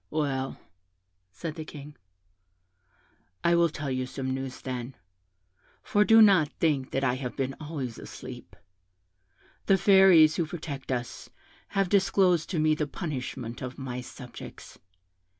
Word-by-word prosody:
'Well,' 135 -3 -2 0.7
said 125 - -6
the 160 - -6
King, 150 -1 -10 1.5
'I 170 - +4
will 170 0 +4
tell 145 -3 -5
you 130 0 -2
some 130 0 -4
news, 135 -1 -5
then; 125 0 -5 0.9
for 210 - +3
do 225 +1 +7
not 185 -8 +5
think 140 -5 0
that 135 - -2
I 125 -2 +2
have 130 -1 -5
been 135 -1 -1
always 145 -6 -5
asleep. - - -10 1.1
The 195 - +5
Fairies 190 -6 +6
who 170 - 0
protect 145 -5 -6
us 120 -1 -4 0.5
have 195 -1 +3
disclosed 185 -3 +3
to 180 - -2
me 155 0 +3
the 150 -1 -1
punishment 130 -7 -5
of 130 0 -6
my 125 -2 -5
subjects. 125 0 -11
145 Hz, 135 wpm, -28 LUFS, 130-170 Hz, 1.5 s, do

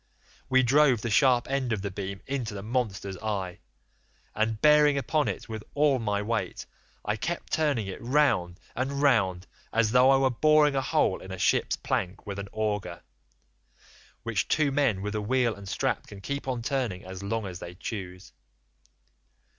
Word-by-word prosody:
We 130 0 +4
drove 135 -2 +4
the 115 - -3
sharp 125 0 +4
end 135 -2 -1
of 105 -3 -1
the 100 - -3
beam 95 0 -5
into 125 -6 -3
the 100 - -6
monster's 105 -5 -2
eye, 100 -5 -3 0.7
and 110 0 0
bearing 150 0 +5
upon 150 +1 0
it 100 - -4
with 110 -2 -6
all 145 -2 +3
my 105 -2 -1
weight 115 +1 -3 0.4
I 105 - 0
kept 170 +10 -4
turning 145 -9 +1
it 95 - -7
round 120 -10 +1 0.2
and 135 +3 -2
round 95 -10 +2 0.3
as 115 -1 +2
though 125 +2 +6
I 135 - +6
were 135 -1 +2
boring 150 +2 +4
a 135 - +2
hole 120 -6 +1
in 95 - -9
a 95 - -5
ship's - - +2
plank 90 +1 -3
with 100 -1 -5
an 100 0 -6
auger, 105 -2 -3 1.2
which 115 -3 -1
two 150 -2 +2
men 130 -9 +1
with 105 0 -3
a 105 - -1
wheel 120 +1 +1
and 100 -1 -10
strap - - -1
can 100 - -10
keep 140 +7 -4
on 125 -3 -2
turning 120 -9 -2
as 95 0 -8
long 110 +2 -2
as 90 -3 -6
they 85 +1 -8
choose. 90 -2 -7
115 Hz, 180 wpm, -27 LUFS, 100-135 Hz, 1.2 s, though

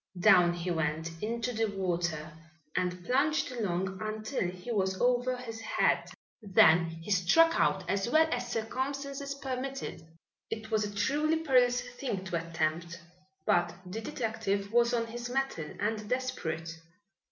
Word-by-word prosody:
Down 180 -3 +6
he 175 +1 -3
went 160 0 -2
into 235 +3 -2
the 225 0 +1
water 175 -6 -2 0.4
and 180 -1 -1
plunged 280 - +2
along 190 -5 -2
until 215 -1 -2
he 180 +6 -7
was 190 -3 0
over 250 +1 +2
his 225 -3 -7
head. - - +1 0.3
Then 175 -4 +5
he 165 +4 -7
struck 265 - +5
out 190 -2 +2
as 195 +4 0
well 320 +4 +5
as 240 - -2
circumstances 275 +4 -3
permitted. 270 -7 -4 0.5
It 220 0 -5
was 215 -1 +2
a 205 0 -6
truly 300 +9 +2
perilous 250 -5 +3
thing 245 -5 -4
to 175 -3 -1
attempt, 165 +1 -1 0.5
but 175 0 +2
the 195 +5 -5
detective 220 -6 -2
was 235 0 +4
on 235 -1 +1
his 240 +1 -6
mettle 255 - -1
and 210 0 -2
desperate. 165 -11 -3
215 Hz, 140 wpm, -30 LUFS, 180-250 Hz, 0.5 s, Down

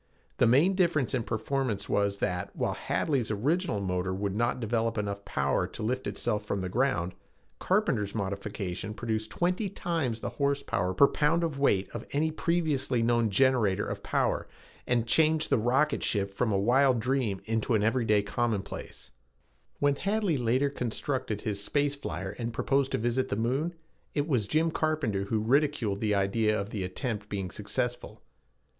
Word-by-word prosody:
The 125 - +4
main 145 +11 +5
difference 170 -9 +1
in 130 - +1
performance 115 -1 -2
was 100 -1 +1
that, 90 -2 -2
while - - 0
Hadley's 135 -7 -1
original 135 - 0
motor 95 -1 -1
would 100 0 -2
not 120 +3 0
develop 115 -1 0
enough 100 -1 -3
power 70 0 0
to - - -7
lift 130 +4 -1
itself 105 0 -1
from 100 -2 -2
the 95 - -3
ground, 95 -6 0 0.5
Carpenter's 135 - +1
modification 100 0 -4
produced 110 -2 -2
twenty 180 - 0
times 165 - -2
the - - -4
horsepower 140 -10 0
per 140 - +7
pound 155 +4 +1
of 155 -4 -2
weight 100 -9 +2
of 115 +1 -7
any 155 +3 +1
previously 155 -7 0
known 115 -1 +2
generator 105 -3 +3
of - - -5
power - - 0 0.4
and 120 -2 +2
changed 155 +5 +3
the - - +4
rocket 135 +6 +2
ship 100 -2 0
from 115 +2 0
a 100 - +2
wild 125 +5 +4
dream 120 -5 0 0.2
to 120 +1 +1
an 105 - +2
everyday 110 -3 +2
commonplace. 100 - -3 0.7
When 145 -1 +2
Hadley 200 -3 0
later 130 +3 +1
constructed 125 -3 -2
his 100 -3 -2
space 145 +4 +1
flyer 95 - -5
and 115 0 -2
proposed 135 +3 +1
to - - +2
visit 120 +3 0
the - - 0
moon, 135 +10 -1 0.4
it 145 0 0
was 125 -9 +1
Jim 160 +7 +2
Carpenter 150 -12 0
who 110 +2 0
ridiculed 130 -5 +1
the 105 -2 +2
idea 105 +2 +1
of 100 +2 -5
the 100 -4 -3
attempt 105 +2 -4
being 95 -3 -3
successful. 120 +3 -3
115 Hz, 165 wpm, -29 LUFS, 100-140 Hz, 0.7 s, per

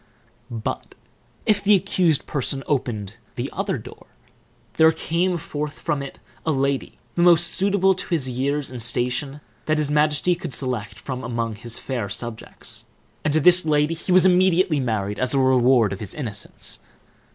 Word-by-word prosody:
But, 115 -3 -5 0.5
if 205 -2 +2
the 205 +1 +6
accused 180 -5 +1
person 135 -1 -2
opened 115 -8 -2 0.2
the - - -4
other - - -1
door, - - -12 0.7
there 160 0 +5
came 175 +3 0
forth 150 -1 -5
from 145 - -2
it 140 - -8 0.3
a 160 - 0
lady, 135 -1 -1 0.2
the 175 - 0
most 175 -1 +6
suitable 195 0 +3
to 185 - -6
his 155 -7 +1
years 135 +2 -2
and 125 -2 -4
station 125 +5 -1 0.3
that 155 0 +2
his 150 -1 0
majesty 150 +3 +2
could 170 -8 -3
select 110 -5 -5
among 120 -3 -3
his 115 +2 -2
fair 120 -7 -4
subjects, 115 +2 -5 0.4
and 150 - +1
to 155 - +3
this 180 +3 +6
lady 150 0 +2
he 165 +3 -3
was 185 0 +6
immediately 180 -3 +4
married, 105 -5 -2
as 130 +2 +1
a - - +3
reward 125 -4 +4
of 95 - -7
his 105 -3 -3
innocence. 110 -8 -5
140 Hz, 165 wpm, -23 LUFS, 120-165 Hz, 0.7 s, the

